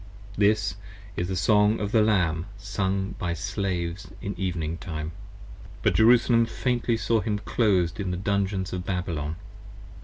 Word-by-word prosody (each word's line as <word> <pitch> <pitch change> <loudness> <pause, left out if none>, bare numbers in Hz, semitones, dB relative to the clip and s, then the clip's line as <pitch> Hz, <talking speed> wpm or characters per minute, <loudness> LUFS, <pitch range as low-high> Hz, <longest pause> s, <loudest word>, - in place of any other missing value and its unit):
This 100 -2 +2 0.4
is 90 - -1
the 95 - -2
Song 105 +4 +3
of 105 -1 -2
the 110 - +4
Lamb, 90 -5 +2
sung 95 0 -2
by 85 -1 -1
Slaves 95 0 -3
in 100 - -4
evening 85 -3 -2
time. 80 -2 -5 0.7
But - - +3
Jerusalem 115 0 +5
faintly 120 -1 0
saw 115 -1 +1
him, 105 -1 -1
clos'd 100 -4 +1
in 95 -2 -2
the 90 - -2
Dungeons 100 -1 -1
of 90 -1 -3
Babylon. 85 -5 -2
95 Hz, 145 wpm, -26 LUFS, 90-105 Hz, 0.7 s, Jerusalem